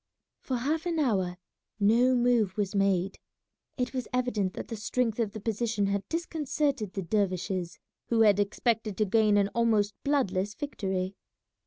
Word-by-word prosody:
For 255 - -2
half 305 +7 -1
an 335 -2 -1
hour 190 - +1 0.4
no 235 +5 +4
move 240 -5 +2
was 205 -1 -1
made. 195 -1 +1 0.6
It 250 -1 -2
was 255 -2 -3
evident 235 -7 0
that - - -6
the 230 - -5
strength 225 +2 -1
of 220 -3 0
the 215 - -6
position 220 -1 -1
had 200 0 -2
disconcerted 295 - -1
the 195 - -3
dervishes, 185 -2 -1 0.3
who 230 -1 +2
had 205 -2 +5
expected 215 0 0
to 215 - +2
gain 210 0 +3
an 200 0 +3
almost 220 -3 +2
bloodless 205 -9 0
victory. 190 -9 -3
215 Hz, 155 wpm, -29 LUFS, 195-245 Hz, 0.6 s, had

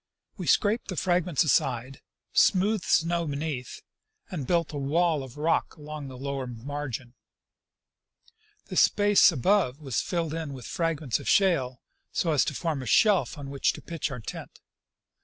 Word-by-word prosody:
We - - -6
scraped 215 +2 +2
the 185 - -4
fragments 175 -3 +1
aside, 130 -3 0 0.3
smoothed 200 +1 +3
the - - -7
snow 170 0 +2
beneath, 140 -3 -4 0.5
and 150 -9 -4
built 170 -3 +1
a - - -3
wall 155 +2 +1
of 130 0 -10
rock 160 +3 0
along 150 -1 -8
the 130 -1 -9
lower 135 0 -4
margin. 125 0 -6 1.5
The - - -6
space 205 -2 +5
above 165 - +1
was 135 -6 -2
filled 165 -3 -2
in 160 -3 -4
with 130 -3 -9
fragments 160 -7 -1
of - - -4
shale, 135 -11 +2 0.3
so 165 - 0
as 150 - +3
to 150 - -3
form 160 -3 -2
a 130 - -7
shelf 200 - +3
on 140 -1 -7
which 140 - +1
to - - -10
pitch 165 -3 -3
our 130 -3 -6
tent. 110 - -8
150 Hz, 160 wpm, -27 LUFS, 135-170 Hz, 1.5 s, space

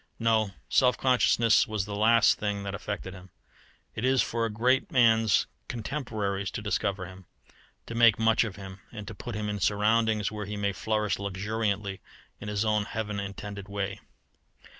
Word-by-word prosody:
No; 110 -2 +2 0.2
self 125 -1 +3
consciousness 120 -3 +3
was 105 -3 -2
the 100 0 -5
last 115 +2 +4
thing 100 -1 -2
that 100 0 -4
affected 100 -1 -5
him. 90 -1 -12 0.6
It 110 - -5
is 130 0 +3
for 115 0 -1
a - - -5
great 125 +5 +1
man's 115 -4 +4 0.2
contemporaries 110 -6 -3
to - - -4
discover 100 -2 -1
him, 90 +1 -12 0.6
to - - -7
make 115 -2 +5
much 115 0 +3
of 105 -5 -5
him, 95 -1 -9
and 105 -3 -8
to - - -6
put 110 +3 -7
him 105 0 -3
in 105 0 -3
surroundings 105 +2 +2
where 105 -2 -5
he 105 0 -5
may 100 -1 0
flourish 105 +1 -1
luxuriantly 100 0 -2 0.4
in 105 - -8
his 105 +1 -1
own 105 -1 +1
heaven 105 -2 -4
intended 100 0 -7
way. 100 -1 -3
105 Hz, 170 wpm, -28 LUFS, 100-115 Hz, 0.6 s, make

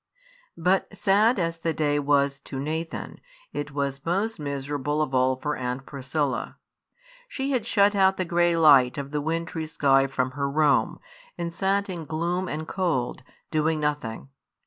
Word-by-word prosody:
But 185 +3 +1
sad 210 +6 +3
as 165 -2 -1
the 165 0 -1
day 145 -1 +1
was 140 -1 +2
to 135 - -7
Nathan, 160 +4 -4 0.3
it 145 0 -3
was 140 -1 -3
most 195 +6 -1
miserable 145 0 -2
of 150 -3 -1
all 130 0 +3
for 150 +3 -3
Aunt 125 +1 -4
Priscilla. 140 0 -3 0.7
She 275 - -3
had 240 -4 0
shut 205 -2 +4
out 190 -1 +4
the 185 - -1
grey 175 0 +2
light 140 -5 +6
of 140 -1 -5
the 150 -1 -1
wintry 160 +1 -3
sky 135 -3 +3
from 130 -1 -1
her 140 +1 -2
room, 150 0 +2 0.4
and 170 -1 -4
sat 200 +2 0
in 180 -3 -5
gloom 170 +4 -2
and 155 0 -4
cold, 160 -10 -1 0.3
doing 155 0 +1
nothing. 145 -5 -3
155 Hz, 160 wpm, -25 LUFS, 140-175 Hz, 0.7 s, light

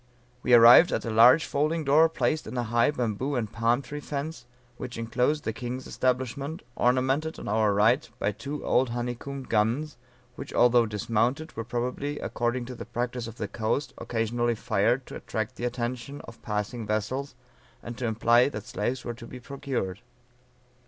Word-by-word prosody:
We 125 -1 +5
arrived 120 +9 +9
at - - -1
a 115 - -2
large 120 +8 +7
folding 155 +3 0
door 155 +3 +5
placed 155 -1 -1
in 120 +3 -6
a 120 - 0
high 120 +3 +2
bamboo 125 0 -2
and 115 -4 -2
palm 115 +4 +1
tree 150 +1 -6
fence, 145 -3 -5 0.3
which 125 -2 -7
inclosed 125 +6 0
the 110 - -2
king's 125 +3 -5
establishment, 130 +5 -2
ornamented 130 +5 +1
on - - -8
our 105 0 +2
right 110 +7 +3
by 105 - 0
two 140 +8 -6
old 130 0 +2
honeycombed 125 +3 -5
guns, 115 +8 0 0.4
which, 140 - -8
although 120 -1 +5
dismounted, 115 +8 -1
were 115 - -3
probably, 125 +5 -3
according 120 +1 -2
to 125 - -7
the - - -8
practice 120 0 -3
of 115 - -9
the 105 - -3
coast, 115 +6 -2
occasionally 120 +1 -1
fired 115 +4 +1
to - - -8
attract 110 +3 -4
the 120 - -4
attention 125 +3 -4
of 115 - -13
passing 105 +2 -3
vessels, 125 +6 -2 0.5
and 120 - -6
to 125 - -1
imply 120 +3 +4
that 110 -6 -7
slaves 120 +4 -3
were 120 - -3
to 115 0 -11
be 125 - -9
procured. 125 -8 -4
120 Hz, 170 wpm, -27 LUFS, 115-135 Hz, 0.5 s, arrived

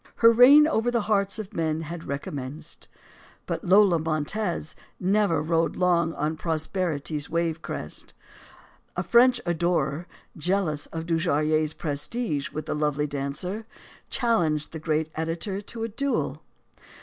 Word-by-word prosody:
Her 230 0 +6
reign 275 +6 +8
over 240 -6 +1
the 235 -1 +1
hearts 200 -1 +1
of 215 -1 -7
men 160 -3 -1
had 165 +1 -7
recommenced. 140 +2 -6 0.6
But - - -3
Lola 190 -2 +5
Montez 160 +2 -2 0.2
never 195 -4 +2
rode 165 +1 +1
long 170 -2 +2
on 155 +2 -2
prosperity's 160 -2 -2
wave 165 -1 -1
crest. - - -6 0.8
A - - -1
French 245 +1 +5
adorer, 170 -2 0 0.3
jealous 170 -3 -1
of 165 0 -6
Dujarrier's 155 -2 +1
prestige 150 - -3
with 155 0 -5
the - - -2
lovely 150 -1 0
dancer, 150 +10 -4 0.4
challenged 170 - +1
the 160 - -6
great 155 0 -1
editor 165 +5 -3
to 225 +2 -6
a - - -1
duel. 275 +5 -2
165 Hz, 130 wpm, -26 LUFS, 155-200 Hz, 0.8 s, reign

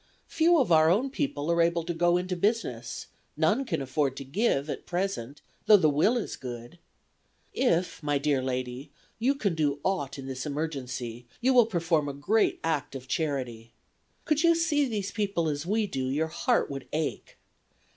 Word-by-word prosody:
Few 335 +1 +3
of 260 - +2
our 160 -1 +6
own 240 +10 +2
people 170 - -2
are 170 0 +3
able 170 0 +2
to 170 +1 -3
go 175 +1 +3
into 180 +1 -2
business; 175 - -1 0.3
none 205 - +2
can 190 - -2
afford 135 0 -1
to - - -5
give 145 - 0
at - - -6
present, 175 -8 -3 0.3
though 210 -1 +9
the 155 -5 +3
will 185 - +3
is 235 - -3
good. 120 +5 -8 0.7
If, 180 -11 +1
my 145 -1 +1
dear 140 -1 +1
lady, 130 +2 -4 0.3
you 265 +5 +2
can 200 -9 0
do 145 -3 0
aught 180 -9 -1
in 135 - -7
this 130 -1 -5
emergency, 130 -6 -4
you 260 +2 +3
will 240 -3 +6
perform 165 -7 0
a - - -4
great 205 +11 +1
act 150 -4 -1
of 130 -1 -8
charity. 125 -7 -3 0.5
Could 305 -1 +2
you 335 0 +5
see 310 -4 +2
these 205 -4 -3
people 200 -6 -1
as 145 +1 -3
we 215 +2 +1
do 130 -9 -3
your 155 +4 0
heart 155 - +1
would 135 -1 -6
ache. 155 0 -3
160 Hz, 180 wpm, -28 LUFS, 135-205 Hz, 0.7 s, though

